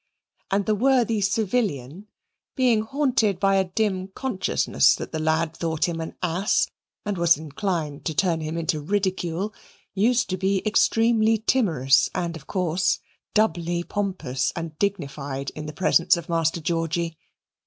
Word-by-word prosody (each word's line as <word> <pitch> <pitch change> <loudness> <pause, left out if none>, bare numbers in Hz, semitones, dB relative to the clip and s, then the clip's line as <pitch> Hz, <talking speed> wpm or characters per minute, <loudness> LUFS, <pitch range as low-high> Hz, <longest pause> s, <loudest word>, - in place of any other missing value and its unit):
And 195 0 +1
the 215 - +2
worthy 235 -1 +2
civilian 195 - -1 0.5
being 245 -5 +3
haunted 225 -6 +1
by 195 -1 +3
a 190 - +2
dim 190 0 -1
consciousness 195 0 +1
that - - -7
the 160 - -3
lad 160 +1 0
thought 160 -1 -1
him 165 -1 -3
an 160 - -6
ass, 180 +4 +1 0.4
and 205 -3 -2
was 170 -2 +5
inclined 155 -1 -3
to 160 - -2
turn 170 -3 +1
him 155 +1 -4
into 165 -1 -1
ridicule, 190 +2 -1 0.4
used 230 +5 +2
to 185 - -1
be 190 +1 0
extremely 225 +1 +3
timorous 170 - +2
and, 170 -2 -2
of 150 -4 -11
course, 180 -1 +1 0.4
doubly 175 -5 +1
pompous 185 -11 -2
and 165 -2 -5
dignified 140 -8 -3
in 155 0 -7
the - - -5
presence 170 +2 +3
of 170 - -7
Master 165 0 0
Georgy. 165 0 -1
180 Hz, 145 wpm, -24 LUFS, 160-205 Hz, 0.5 s, was